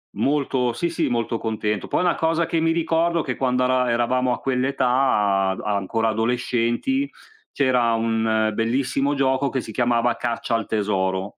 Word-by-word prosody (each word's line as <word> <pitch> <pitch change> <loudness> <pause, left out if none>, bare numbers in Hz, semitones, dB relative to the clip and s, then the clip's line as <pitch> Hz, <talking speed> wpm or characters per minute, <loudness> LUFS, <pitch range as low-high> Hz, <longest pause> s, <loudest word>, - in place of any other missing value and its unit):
Molto 135 -4 0
sì, 170 +8 -2
sì, 165 - -1
molto 115 -1 -1
contento. 105 -2 -2
Poi - - 0
una 180 -1 +2
cosa 165 +1 +1
che 165 0 -1
mi 165 0 +2
ricordo, 165 0 +1
che 125 -4 -4
quando 125 -1 +1
ara 125 -1 +2
eravamo 125 +2 +1
a - - -4
quell'età, 130 0 0 0.6
ad 95 - -5
ancora 105 +2 -1
adolescenti, 120 - 0 0.4
c'era 125 -4 +2
un 110 -1 +1
bellissimo 135 +5 0
gioco, 135 0 +1
che 135 -1 -2
si 110 - -9
chiamava 120 +1 +1
"Caccia 120 -1 -2
al 115 -1 -1
tesoro". 95 -2 -1
125 Hz, 160 wpm, -22 LUFS, 115-135 Hz, 0.6 s, una